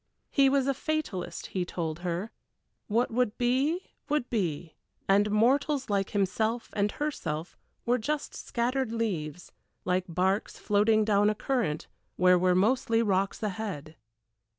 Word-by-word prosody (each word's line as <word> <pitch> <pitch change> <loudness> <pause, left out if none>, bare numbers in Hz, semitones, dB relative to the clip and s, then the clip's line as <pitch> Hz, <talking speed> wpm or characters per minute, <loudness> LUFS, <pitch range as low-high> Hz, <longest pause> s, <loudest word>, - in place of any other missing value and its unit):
He 275 -2 +5
was 270 -1 +2
a 275 - +2
fatalist, 275 - -3
he 185 - 0
told 165 -2 -4
her; 180 +4 -3 0.6
what 230 +3 +1
would 235 -2 0
be 270 +9 0 0.2
would 295 -4 +1
be, 175 -7 -2 0.3
and 205 +2 +4
mortals 260 +4 +2
like 195 -1 +1
himself 220 +4 0
and 205 0 0
herself 180 - -3 0.3
were 245 +1 +2
just 295 +6 -2
scattered 250 +1 -1
leaves, 180 -8 -3 0.3
like 180 0 +1
barks 190 +4 0
floating 215 +1 +3
down 205 -1 +4
a 215 - 0
current 215 - -1 0.3
where 180 0 +5
were 180 0 +3
mostly 230 +3 +2
rocks 195 +1 0
ahead. 185 -7 -4
210 Hz, 135 wpm, -29 LUFS, 185-245 Hz, 0.6 s, He